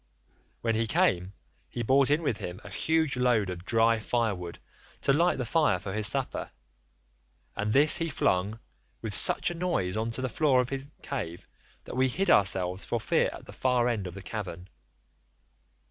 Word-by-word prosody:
When 115 Hz, -1 st, +1 dB
he 115 Hz, +1 st, 0 dB
came, 95 Hz, -2 st, +1 dB, 0.4 s
he 120 Hz, -, -4 dB
brought 135 Hz, +3 st, +4 dB
in 150 Hz, +3 st, +2 dB
with 125 Hz, -8 st, 0 dB
him 90 Hz, +2 st, -6 dB
a -, -, -10 dB
huge 160 Hz, -4 st, +1 dB
load 120 Hz, -6 st, +2 dB
of 90 Hz, -1 st, -7 dB
dry 115 Hz, +2 st, +3 dB
firewood 105 Hz, -7 st, -2 dB, 0.4 s
to 140 Hz, -, +3 dB
light 170 Hz, +5 st, +3 dB
the 130 Hz, -, -2 dB
fire 115 Hz, -, +2 dB
for 95 Hz, +1 st, -6 dB
his 105 Hz, -1 st, +1 dB
supper, 135 Hz, +3 st, -1 dB, 1.1 s
and 105 Hz, +1 st, -1 dB
this 145 Hz, +7 st, +5 dB
he 165 Hz, -1 st, -1 dB
flung 100 Hz, -5 st, 0 dB, 0.5 s
with 110 Hz, -2 st, -3 dB
such -, -, +1 dB
a -, -, -4 dB
noise 170 Hz, -, -1 dB
on 110 Hz, +1 st, -1 dB
to 115 Hz, +3 st, -4 dB
the -, -, +1 dB
floor 135 Hz, +1 st, +2 dB
of 125 Hz, 0 st, 0 dB
his 135 Hz, 0 st, -5 dB
cave 90 Hz, -, -5 dB, 0.4 s
that -, -, -8 dB
we 130 Hz, +1 st, +3 dB
hid 190 Hz, +10 st, +1 dB
ourselves 95 Hz, -2 st, +3 dB
for -, -, -1 dB
fear -, -, +1 dB
at -, -, -10 dB
the -, -, -11 dB
far 125 Hz, -2 st, +1 dB
end 110 Hz, -6 st, -1 dB
of 90 Hz, -, -8 dB
the 100 Hz, -, -9 dB
cavern. 95 Hz, -5 st, -6 dB
115 Hz, 185 wpm, -28 LUFS, 95-135 Hz, 1.1 s, this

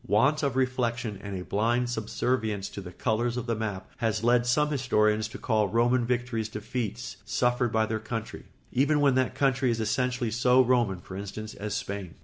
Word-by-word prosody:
Want 125 Hz, +10 st, +3 dB
of 140 Hz, -4 st, 0 dB
reflection 125 Hz, -5 st, -1 dB
and 100 Hz, -2 st, -5 dB
a -, -, -5 dB
blind 120 Hz, +4 st, +1 dB
subservience 110 Hz, -2 st, -1 dB
to 100 Hz, -, -7 dB
the 90 Hz, -2 st, -9 dB
colours 120 Hz, +3 st, -1 dB
of 125 Hz, -, -3 dB
the 120 Hz, -, 0 dB
map 105 Hz, -4 st, -4 dB
has 110 Hz, -1 st, -1 dB
led 120 Hz, 0 st, +3 dB
some 150 Hz, +4 st, +2 dB
historians 110 Hz, -5 st, +2 dB
to 110 Hz, -, -9 dB
call 110 Hz, -4 st, +1 dB
Roman 120 Hz, +3 st, +2 dB
victories 120 Hz, -3 st, -1 dB
defeats 110 Hz, +1 st, -4 dB
suffered 120 Hz, -1 st, +1 dB
by 110 Hz, 0 st, +2 dB
their 110 Hz, 0 st, -2 dB
country, 115 Hz, 0 st, -5 dB, 0.3 s
even 145 Hz, +4 st, +2 dB
when 140 Hz, -2 st, +4 dB
that 130 Hz, -1 st, +1 dB
country 135 Hz, -2 st, +2 dB
is 115 Hz, -1 st, 0 dB
essentially 125 Hz, +1 st, 0 dB
so 125 Hz, +2 st, +4 dB
Roman, 120 Hz, -7 st, +1 dB
for 95 Hz, -, -9 dB
instance, 105 Hz, +2 st, -6 dB
as 105 Hz, 0 st, -4 dB
Spain. 100 Hz, -4 st, -5 dB
115 Hz, 185 wpm, -28 LUFS, 105-125 Hz, 0.3 s, when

